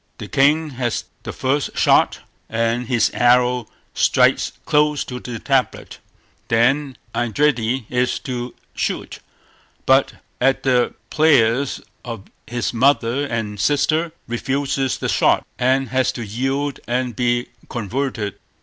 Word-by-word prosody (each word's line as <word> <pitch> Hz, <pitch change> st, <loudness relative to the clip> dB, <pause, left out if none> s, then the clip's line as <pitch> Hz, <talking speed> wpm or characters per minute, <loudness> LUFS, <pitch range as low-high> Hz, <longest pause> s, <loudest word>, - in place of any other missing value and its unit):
The -, -, -7 dB
king 150 Hz, +3 st, +2 dB
has 120 Hz, -3 st, -2 dB, 0.2 s
the -, -, -6 dB
first 135 Hz, +2 st, -1 dB
shot, -, -, +3 dB, 0.3 s
and 115 Hz, +1 st, 0 dB
his 120 Hz, -3 st, +2 dB
arrow 125 Hz, -1 st, +3 dB, 0.3 s
strikes -, -, +3 dB
close 150 Hz, 0 st, +2 dB
to 125 Hz, -1 st, -6 dB
the 120 Hz, -1 st, -6 dB
tablet. 135 Hz, +2 st, -1 dB, 0.5 s
Then 130 Hz, +3 st, +2 dB, 0.2 s
Eindridi 120 Hz, 0 st, +1 dB
is 125 Hz, 0 st, 0 dB
to 125 Hz, -4 st, -5 dB, 0.2 s
shoot, -, -, -3 dB, 0.7 s
but 135 Hz, +1 st, +4 dB, 0.3 s
at 135 Hz, +1 st, +2 dB
the 125 Hz, -2 st, +2 dB, 0.2 s
prayers 140 Hz, -4 st, +3 dB, 0.2 s
of 115 Hz, -5 st, -6 dB, 0.2 s
his 120 Hz, 0 st, -2 dB
mother 130 Hz, +2 st, +2 dB
and 110 Hz, -4 st, -3 dB
sister, 155 Hz, -, +1 dB, 0.2 s
refuses 135 Hz, +2 st, -1 dB
the -, -, -3 dB
shot, -, -, +2 dB
and 130 Hz, +1 st, +2 dB
has 130 Hz, +1 st, +1 dB
to 120 Hz, -, -5 dB
yield 135 Hz, +6 st, -2 dB
and 125 Hz, -1 st, -1 dB
be 120 Hz, 0 st, 0 dB, 0.2 s
converted. 115 Hz, -3 st, -3 dB
125 Hz, 120 wpm, -20 LUFS, 120-135 Hz, 0.7 s, but